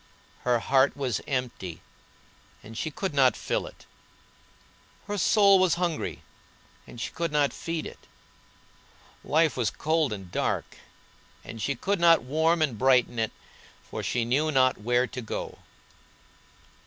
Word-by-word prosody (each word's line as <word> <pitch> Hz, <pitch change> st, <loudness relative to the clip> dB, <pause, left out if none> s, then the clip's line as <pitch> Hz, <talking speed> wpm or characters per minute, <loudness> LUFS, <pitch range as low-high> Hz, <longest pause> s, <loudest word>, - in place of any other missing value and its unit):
Her 125 Hz, -1 st, +1 dB
heart 135 Hz, +4 st, +2 dB
was 130 Hz, -4 st, -2 dB
empty 120 Hz, -, -3 dB, 0.8 s
and 110 Hz, +2 st, -11 dB
she 155 Hz, -, -2 dB
could 185 Hz, +3 st, -4 dB
not 130 Hz, -5 st, +4 dB
fill -, -, -2 dB
it; -, -, -14 dB, 1.2 s
her 205 Hz, -, -3 dB
soul 200 Hz, 0 st, +5 dB
was 185 Hz, -2 st, +3 dB
hungry 170 Hz, -3 st, -3 dB, 0.6 s
and 120 Hz, -, -11 dB
she -, -, -4 dB
could 170 Hz, -1 st, -3 dB
not 145 Hz, -1 st, +2 dB
feed 165 Hz, -1 st, -4 dB
it; -, -, -11 dB, 1.2 s
life 160 Hz, 0 st, +2 dB
was 120 Hz, -4 st, 0 dB
cold 155 Hz, -3 st, 0 dB
and 95 Hz, -4 st, -7 dB
dark -, -, -2 dB, 0.7 s
and 115 Hz, -, -8 dB
she 140 Hz, +5 st, -1 dB
could 195 Hz, +9 st, -1 dB
not 170 Hz, -1 st, +5 dB
warm 160 Hz, +5 st, +2 dB
and 125 Hz, -8 st, -2 dB
brighten 125 Hz, -2 st, +3 dB
it, 110 Hz, -, 0 dB, 0.6 s
for -, -, -4 dB
she 120 Hz, -2 st, -1 dB
knew 145 Hz, +6 st, +1 dB
not 130 Hz, -2 st, +3 dB
where 120 Hz, +3 st, +2 dB
to 125 Hz, 0 st, -7 dB
go. 110 Hz, -, -6 dB
135 Hz, 140 wpm, -27 LUFS, 120-165 Hz, 1.2 s, soul